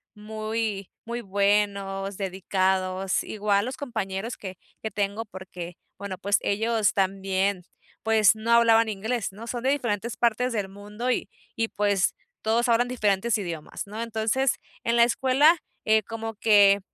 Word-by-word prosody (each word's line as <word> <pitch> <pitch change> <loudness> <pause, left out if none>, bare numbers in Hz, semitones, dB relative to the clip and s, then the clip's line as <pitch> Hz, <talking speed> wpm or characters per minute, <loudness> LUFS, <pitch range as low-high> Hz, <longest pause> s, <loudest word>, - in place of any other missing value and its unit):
muy 215 -1 -3 0.2
muy 235 +1 -4
buenos, 200 -1 0
dedicados, 190 -1 0
igual 205 -1 0
los 255 +1 -5
compañeros 225 -4 -4
que 190 -2 -8 0.3
que 220 - -3
tengo 205 +2 -2
porque, 185 -3 -8 0.2
bueno, 200 -2 -6
pues, 200 +1 +2
ellos 220 0 +1
también, 195 0 0 0.4
pues 220 -2 +5
no 220 +2 -2
hablaban 230 -1 +6
inglés, 220 +2 -2
¿no? 215 +4 -10
Son 240 0 -4
de 260 - +2
diferentes 235 -5 -1
partes 240 +2 +1
del 205 -3 -2
mundo 210 +5 -5
y - - -1 0.3
y 225 0 0
pues 200 -2 +1 0.3
todos 230 +3 +2
hablan 235 +1 +3
diferentes 215 -2 +1
idiomas, 170 -3 -5
¿no? 215 +3 -6
Entonces 230 +3 +1 0.3
en 235 - +1
la 235 - +7
escuela, 265 +7 +4 0.3
eh, 220 0 +4
como 225 +1 -6
que 205 -2 +6
210 Hz, 145 wpm, -26 LUFS, 195-230 Hz, 0.4 s, la